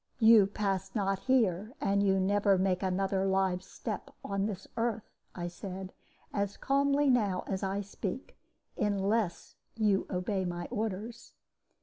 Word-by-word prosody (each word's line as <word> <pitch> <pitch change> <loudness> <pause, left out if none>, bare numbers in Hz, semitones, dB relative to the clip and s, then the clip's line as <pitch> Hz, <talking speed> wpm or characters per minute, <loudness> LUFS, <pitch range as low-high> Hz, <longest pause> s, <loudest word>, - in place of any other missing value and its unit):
"'You 220 -3 +7
pass 195 -2 -2
not 195 -2 +1
here, 220 -4 +1
and 200 0 +2
you 195 -1 +3
never 200 +1 +3
make 185 -1 +1
another 190 0 0
live 190 -1 +1
step 190 - -6 0.2
on 200 0 0
this 195 -3 -6
earth,' 230 -2 -2 0.2
I 175 -1 -3
said, 185 +1 -7 0.4
as 200 -1 -1
calmly 280 +1 +2
as - - +6
now 200 -7 +1 0.2
I 195 +1 -1
speak, 205 +4 -5 0.4
'unless 205 -1 0 0.2
you 210 -3 +2
obey 190 +1 -1
my 175 -1 -3
orders.' 220 +2 -4
195 Hz, 135 wpm, -31 LUFS, 190-215 Hz, 0.4 s, You